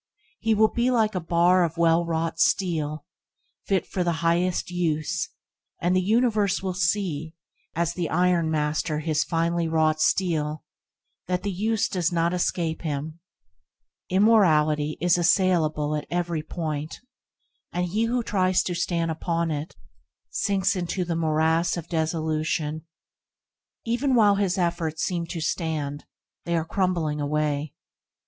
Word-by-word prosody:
He 225 -1 +1
will 215 +1 +4
be 240 +1 +1
like 225 -4 +2
a 185 - -1
bar 175 +2 +3
of 165 -1 -2
well 170 0 +3
wrought 165 0 -2
steel, 155 -6 0 0.6
fit 195 -2 +1
for 185 - -2
the 170 -1 +1
highest 175 +2 +1
use, 160 -4 -1 0.5
and 175 +2 +1
the 185 - +3
universe 210 -1 +1
will 190 -1 -1
see, 170 -3 -1 0.4
as 170 +1 0
the 175 -3 -3
ironmaster 160 -3 +1
his 155 -1 +1
finely 170 0 0
wrought 155 -1 +1
steel, 155 -3 0 0.6
that 180 0 -1
the 205 - -1
use 220 +4 0
does 180 -4 -1
not 170 0 +1
escape 170 -2 -1
him. 155 +1 -4 0.9
Immorality 155 -7 +3
is 175 0 +3
assailable 165 -4 +2
at 150 - -4
every 170 -2 -1
point, 155 -1 -4 0.7
and 180 0 -1
he 210 +6 0
who 240 +1 0
tries 185 -3 +2
to 180 - -2
stand 170 -1 -1
upon 165 0 -1
it, 150 +2 -4 0.6
sinks 200 0 +1
into 180 0 -2
the 170 -1 -2
morass 160 +1 +1
of 170 -1 -6
desolation. 160 -1 -2 1.0
Even 245 +3 +1
while 210 -3 +5
his 195 -2 0
efforts 170 -3 -1
seem 170 -2 -2
to 170 - -5
stand, 155 -3 -2 0.4
they 170 - 0
are 160 - -1
crumbling 165 -5 -1
away. 150 0 -1
170 Hz, 140 wpm, -25 LUFS, 155-185 Hz, 1.0 s, while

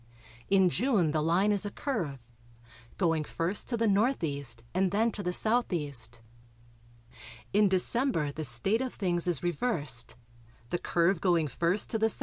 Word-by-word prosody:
In 190 -1 +5
June 205 - +1
the 155 0 0
line 175 +6 +2
is 205 -1 +1
a 205 - -3
curve, 165 - -4 0.7
going 165 -4 +1
first 170 +6 -2
to 235 - -1
the 230 - +1
N.E. 195 - +1 0.3
and 190 +1 +2
then 220 +5 +1
to 210 - -5
the 180 - -2
S.E. 180 -7 +1 1.6
In 205 0 +4
December 185 - 0
the 155 +2 -5
state 155 - 0
of 260 -1 -3
things 175 -2 -1
is 175 -4 +1
reversed, 165 - -2 0.6
the 175 - 0
curve 170 +1 +1
going 170 -5 +2
first 175 +7 -1
to 225 - 0
the 220 - +3
S.E. 225 - -3
185 Hz, 155 wpm, -29 LUFS, 165-215 Hz, 1.6 s, In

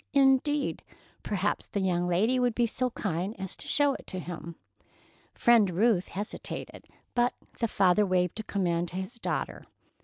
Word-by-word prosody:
Indeed! 275 +1 +3 0.4
Perhaps 205 0 -1
the 200 - -2
young 180 -2 +1
lady 215 +9 +2
would 245 -2 +1
be 240 - +3
so 250 +2 -1
kind 195 -2 -3
as 190 -1 -5
to - - -11
show 285 -1 +3
it - - -9
to 185 - -5
him? 170 -2 -6 0.8
Friend 230 -5 +5
Ruth 190 +1 +2
hesitated, 205 +3 -6 0.3
but 245 0 +2 0.2
the 230 - +2
father 195 -1 +4
waved 185 0 +1
a - - -3
command 175 -4 0
to - - -10
his 190 +6 -5
daughter. - - -3
205 Hz, 160 wpm, -29 LUFS, 180-240 Hz, 0.8 s, Friend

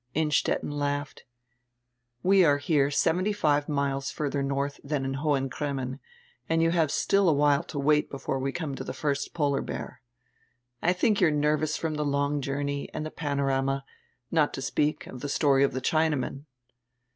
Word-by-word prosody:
Innstetten 150 -1 +1
laughed. 145 0 -3 1.0
"We 190 0 +5
are 145 -4 +4
here 145 -1 +2
seventy 180 +7 +1
five 150 -7 +1
miles 140 -2 -1
further 145 -1 -2
north 140 +1 -2
dian 140 -1 -2
in 135 - -2
Hohen 135 -1 0
Cremmen, 135 -1 -4 0.5
and 165 0 +3
you 165 - +3
have 165 -3 +2
still 195 -2 +3
a - - +4
while 145 0 +3
to - - -7
wait 150 +2 +2
before 135 -1 -3
we 135 +1 -1
come 160 -2 -4
to - - -5
die - - -5
first 145 -1 -2
polar 145 -3 +1
bear. 120 - -6 0.8
I 175 - +3
diink 200 +3 +2
you 175 - +6
are - - +2
nervous 150 +1 +1
from 155 -2 -2
die - - -1
long 145 0 0
journey 140 +1 -3
and 155 - -3
die 155 - -5
Pano 140 -3 -2
rama, 135 0 0 0.5
not 155 -3 +2
to - - -5
speak 150 +2 0
of 125 - -9
die 145 - -3
story 140 -1 +3
of 140 - +2
die 130 - -3
Chinaman." 150 -2 0
145 Hz, 180 wpm, -27 LUFS, 140-155 Hz, 1.0 s, you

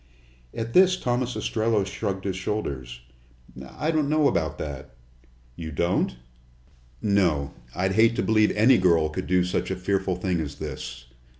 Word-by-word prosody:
At 115 0 -5
this 185 0 +6
Thomas 125 -3 -1
Ostrello 110 -2 0
shrugged 95 -2 -4
his 95 -2 -2
shoulders. 70 - -4 0.8
"I 155 +2 0
don't 155 -3 +1
know 155 -1 +3
about 80 - -1
that." 70 -5 -7 0.6
"You 80 -2 -6
don't?" 85 -2 0 0.9
"No. 85 -9 +1 0.2
I'd 95 +3 0
hate 115 +3 +4
to - - 0
believe 110 -1 +3
any 115 +3 +6
girl 85 -4 +3
could 75 - -5
do 90 0 +3
such 90 - -2
a 95 - -1
fearful 95 0 -1
thing 90 -1 -1
as 70 -2 -5
this." 60 -3 -7
95 Hz, 155 wpm, -25 LUFS, 80-115 Hz, 0.9 s, this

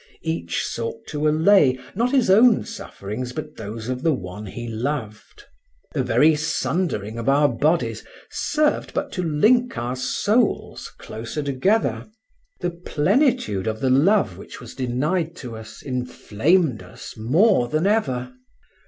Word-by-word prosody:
Each 85 +1 -2
sought 115 0 -5
to 150 0 -1
allay, 155 -3 +4 0.2
not 235 +5 +1
his 255 -8 +3
own 225 +3 +5
sufferings, 125 - -6
but 150 +1 -7
those 110 +1 -6
of 125 0 -3
the 160 -1 +2
one 100 +1 -8
he 120 +5 -7
loved. 115 - -5 0.5
The - - 0
very 155 +2 +4
sundering 150 - -2
of 115 - -1
our 145 +2 +4
bodies 150 +7 0 0.3
served 305 -1 0
but - - -2
to 185 - -3
link 215 - +2
our 120 +2 -2
souls 205 - 0
closer 115 +7 -6
together; 145 +11 0 0.5
the 175 - -1
plentitude 170 - +1
of 110 0 -2
the 130 +1 +1
love 135 - +3
which - - -10
was 120 -2 -10
denied 150 +7 -1
to 125 -8 -8
us 110 0 -11
inflamed 125 - 0
us - - -11
more 130 - +3
than 155 +7 0
ever. 130 - 0
140 Hz, 140 wpm, -22 LUFS, 115-180 Hz, 0.5 s, own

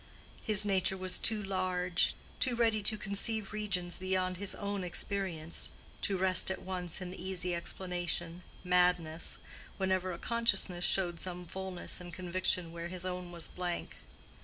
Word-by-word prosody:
His 210 -1 +4
nature 190 -1 +2
was 185 -1 +3
too 215 -2 +3
large, 185 -2 +1 0.2
too 255 -3 +2
ready 225 -2 +3
to 215 +1 +4
conceive 210 +1 -2
regions 180 -5 0
beyond 185 -1 0
his 200 +1 0
own 200 -1 -2
experience, 175 -3 -2 0.3
to 195 - +1
rest 185 -1 +4
at 190 - -3
once 180 -1 -3
in 180 -1 -4
the - - -7
easy 180 -1 -1
explanation, 175 -1 -2 0.2
"madness," 180 -3 +3 0.4
whenever 185 -1 +1
a 170 - -4
consciousness 230 -6 +2
showed 175 -3 +2
some 180 -1 -3
fullness 190 0 -4
and 175 -1 -8
conviction 180 0 +1
where 170 0 -5
his 180 0 -4
own 180 -1 -3
was 170 -2 -3
blank. 175 -1 -3
185 Hz, 150 wpm, -33 LUFS, 175-195 Hz, 0.4 s, His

